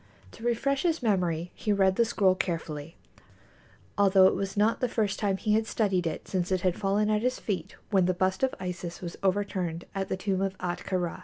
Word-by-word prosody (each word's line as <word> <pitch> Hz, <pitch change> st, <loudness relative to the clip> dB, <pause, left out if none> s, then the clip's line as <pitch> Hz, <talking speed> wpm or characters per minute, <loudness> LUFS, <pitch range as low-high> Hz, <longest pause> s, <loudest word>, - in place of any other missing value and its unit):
To 225 Hz, -, -13 dB
refresh 255 Hz, +4 st, +1 dB
his 330 Hz, -5 st, 0 dB
memory 175 Hz, -5 st, 0 dB
he 215 Hz, -, -2 dB
read 190 Hz, -2 st, +3 dB
the 235 Hz, -, +3 dB
scroll 200 Hz, -4 st, +3 dB
carefully, 165 Hz, -3 st, -4 dB, 1.0 s
although 195 Hz, -1 st, +6 dB
it -, -, +5 dB
was 195 Hz, +1 st, -3 dB
not 215 Hz, +3 st, +3 dB
the 250 Hz, -, 0 dB
first 215 Hz, -4 st, 0 dB
time 200 Hz, -2 st, +1 dB
he 210 Hz, +1 st, 0 dB
had 220 Hz, +1 st, +2 dB
studied 190 Hz, -7 st, +1 dB
it 160 Hz, -, -5 dB
since 180 Hz, -1 st, -1 dB
it 185 Hz, -1 st, +1 dB
had 180 Hz, -1 st, +1 dB
fallen 205 Hz, +2 st, +1 dB
at 210 Hz, 0 st, +2 dB
his 255 Hz, +2 st, 0 dB
feet 185 Hz, -6 st, -4 dB, 0.2 s
when 190 Hz, -3 st, +4 dB
the 185 Hz, -, +1 dB
bust 185 Hz, +1 st, 0 dB
of 265 Hz, -1 st, +1 dB
Isis 180 Hz, -2 st, -5 dB
was 175 Hz, -1 st, -6 dB
overturned 185 Hz, -3 st, -1 dB
at 195 Hz, -1 st, -2 dB
the 190 Hz, -, -1 dB
tomb 190 Hz, 0 st, -1 dB
of 195 Hz, -1 st, -1 dB
Ahtka 180 Hz, +1 st, -2 dB
Rā. 175 Hz, 0 st, -3 dB
195 Hz, 215 wpm, -28 LUFS, 180-210 Hz, 1.0 s, although